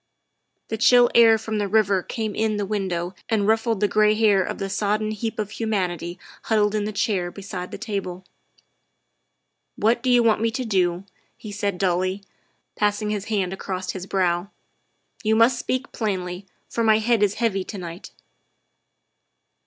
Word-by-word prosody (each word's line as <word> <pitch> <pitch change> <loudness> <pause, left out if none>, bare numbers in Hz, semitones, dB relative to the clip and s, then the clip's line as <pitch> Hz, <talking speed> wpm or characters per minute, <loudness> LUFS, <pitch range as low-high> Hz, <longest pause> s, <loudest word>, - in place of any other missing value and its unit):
' - - -52
' - - -51
The 220 - -3
chill 245 +1 +6
air 225 -1 +7
from 220 -1 -3
the 205 - 0
river 200 -2 +2
came 220 +2 -4
in 215 0 0
the 205 - -1
window 185 -3 -2 0.2
and 210 -3 +1
ruffled 225 -1 +1
the 205 - +4
gray 215 +1 +3
hair 210 -3 +4
of - - -4
the 195 - -3
sodden 210 +2 -1
heap 220 +1 -4
of 210 -1 -3
humanity 180 -6 -2 0.3
huddled 210 -2 +2
in 210 -1 0
the 215 - -2
chair 200 -3 0
beside 190 -1 -7
the - - -7
table. 195 -5 -5 0.6
' - - -50
' - - -52 0.3
What 230 +3 +2
do 260 - -1
you 245 -1 +5
want 220 -2 +3
me 230 - +2
to 250 +3 -3
do 180 -4 +1 0.2
?" - - -39
he 215 - -9
said 200 -2 -2
dully, 185 +1 0 0.5
passing 210 0 0
his 205 -2 -3
hand 195 -4 -1
across 190 -1 -4
his 190 0 -7
brow. 180 -1 0 0.2
' - - -47
' - - -26
You 220 0 +2
must 235 +3 +4
speak 255 +1 -2
plainly, 185 -3 -3 0.2
for 230 - -2
my 220 -1 +5
head 225 0 +1
is 205 -1 +2
heavy 215 -5 0
to 210 - -7
night." 175 -1 -8
205 Hz, 190 wpm, -23 LUFS, 190-220 Hz, 0.6 s, air